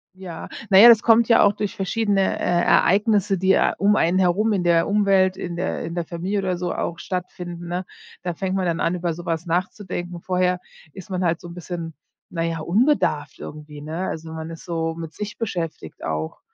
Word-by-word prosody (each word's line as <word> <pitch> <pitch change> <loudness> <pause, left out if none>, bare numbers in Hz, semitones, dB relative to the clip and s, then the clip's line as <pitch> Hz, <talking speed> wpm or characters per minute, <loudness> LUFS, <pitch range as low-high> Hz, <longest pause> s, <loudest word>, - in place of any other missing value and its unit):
Ja. 180 -3 -8 0.2
Na 190 - +6
ja, 225 - +11
das 225 -2 +7
kommt 230 0 +5
ja 230 - +6
auch 205 0 +4
durch 210 -1 -4
verschiedene, 200 0 0
äh, - - -4 0.2
Ereignisse, 200 0 +3
die, 190 +1 +3
äh, - - +3
um 205 +1 +3
einen 175 -2 +2
herum 190 +4 +2
in 185 - 0
der 170 -1 +3
Umwelt, 195 -2 +3
in 170 -1 -5
der 185 +2 -2
in 170 - -5
der 175 -1 -2
Familie 180 +5 -2
oder 185 -2 -1
so 175 0 -2
auch 170 -1 -3
stattfinden, 175 -1 -5
ne? 180 +1 -3 0.4
Da 175 -1 -2
fängt 190 +2 -3
man 190 -1 0
dann 170 -1 -1
an, 170 - +1
über 175 -1 -2
so 175 +2 -9
etwas 165 0 -2
nachzudenken, 175 0 -3
vorher 180 0 +1 0.3
ist 190 -1 -11
man 185 -1 -2
halt 170 -1 +1
so - - -10
'n 170 - -9
bisschen, 170 -2 -6 0.4
na 165 -1 -2
ja, 165 -1 -2
unbedarft 170 - +1
irgendwie, 150 -1 -9
ne, 160 +5 -4
also, 160 0 -6
man 160 0 -6
ist 165 -1 -10
so 165 -2 -2
mit 165 -1 -7
sich 210 0 -6
beschäftigt 170 - -5
auch. 80 0 -3
180 Hz, 210 wpm, -22 LUFS, 165-195 Hz, 0.4 s, ja